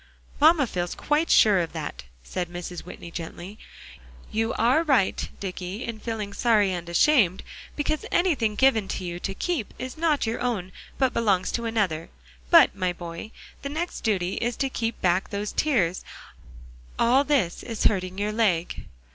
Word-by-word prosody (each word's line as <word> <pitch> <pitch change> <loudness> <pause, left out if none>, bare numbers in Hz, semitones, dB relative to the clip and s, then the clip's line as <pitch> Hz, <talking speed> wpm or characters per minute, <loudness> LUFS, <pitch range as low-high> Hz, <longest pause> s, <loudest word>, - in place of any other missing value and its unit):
"Mamma 305 -1 +6
feels 175 -6 -3
quite 300 +2 0
sure 205 -3 +6
of 165 -2 -2
that," 155 - -6 0.2
said 175 - -4
Mrs. 175 0 -6
Whitney 170 -1 -10
gently. 175 +5 -7 0.7
"You 225 +1 0
are 245 +7 +3
right, 270 - +1
Dicky, 190 +2 -5
in 230 -2 -5
feeling 215 -3 -4
sorry 210 -5 +3
and 175 -1 -5
ashamed, 190 - +3 0.3
because 305 +1 -1
anything 275 - +2
given 225 -5 +3
to 190 - -4
you 175 0 -4
to 195 - -4
keep 325 - -2
is 255 +2 -6
not 315 -4 +1
your 225 +1 -2
own 210 -7 -2 0.3
but 265 -2 +2
belongs 200 -6 +1
to 235 - -2
another; 195 -8 -1 0.4
but, 330 - +7
my 185 -2 0
boy, 170 +3 -7 0.3
the 280 - -4
next 335 +5 -4
duty 190 -5 0
is 240 0 -1
to 270 - 0
keep 230 -2 -2
back 180 +1 +2
those 205 +1 -3
tears 195 - +1 0.9
all 255 +4 +4
this 270 - +1
is 230 -3 -4
hurting 185 -2 +1
your 205 +1 -1
leg." 200 -7 0
215 Hz, 165 wpm, -25 LUFS, 180-255 Hz, 0.9 s, but